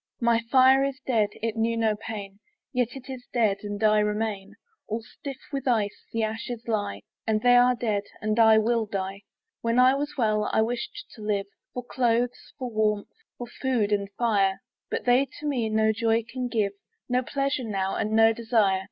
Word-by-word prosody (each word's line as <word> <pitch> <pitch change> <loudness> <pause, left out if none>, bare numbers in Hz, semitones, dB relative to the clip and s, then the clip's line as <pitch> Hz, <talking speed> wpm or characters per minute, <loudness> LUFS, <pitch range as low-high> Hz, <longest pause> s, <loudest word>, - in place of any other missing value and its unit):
My 235 -1 +3
fire 265 0 +6
is 275 -1 -2
dead: 220 -5 +2
it 225 -1 -1
knew 230 +1 0
no 220 -2 +2
pain; 205 -2 -7 0.3
Yet 250 -2 +2
is 265 - -10
it 260 -2 -6
dead, 220 -5 +2
and 205 0 -5
I 215 0 +5
remain. 210 -1 -2 0.3
All 220 +1 -3
stiff 275 +4 -8
with 275 -2 -3
ice 215 -5 0
the 230 -1 -1
ashes 225 +2 -4
lie; 205 - -2 0.3
And 215 -1 +1
they 245 0 +6
are 250 +1 +5
dead, 215 -4 -1
and 215 +1 -1
I 220 -1 +7
will 225 0 +1
die. 195 0 -4 0.4
When 230 +1 0
I 255 +1 +6
was 290 +2 -3
well, 215 -3 +1
I 220 - +3
wished 240 +2 -4
to 220 - -12
live, 205 -2 -1 0.3
For 250 - -3
clothes, 245 -1 0
for 250 -2 -5
warmth, 215 -1 0 0.2
for 245 - -5
food, 240 -4 -1
and 200 -1 0
fire; 200 -3 +1 0.3
But - - -3
they 250 +3 +4
to 300 - -8
me 250 -7 0
no 220 0 +3
joy 225 +1 +1
can 255 +1 -3
give, 215 -4 0 0.4
No 250 0 +1
pleasure 275 0 -1
now, 195 -3 -2
and 215 - -1
no 225 0 +6
desire. 220 -4 +2
225 Hz, 190 wpm, -26 LUFS, 210-245 Hz, 0.4 s, I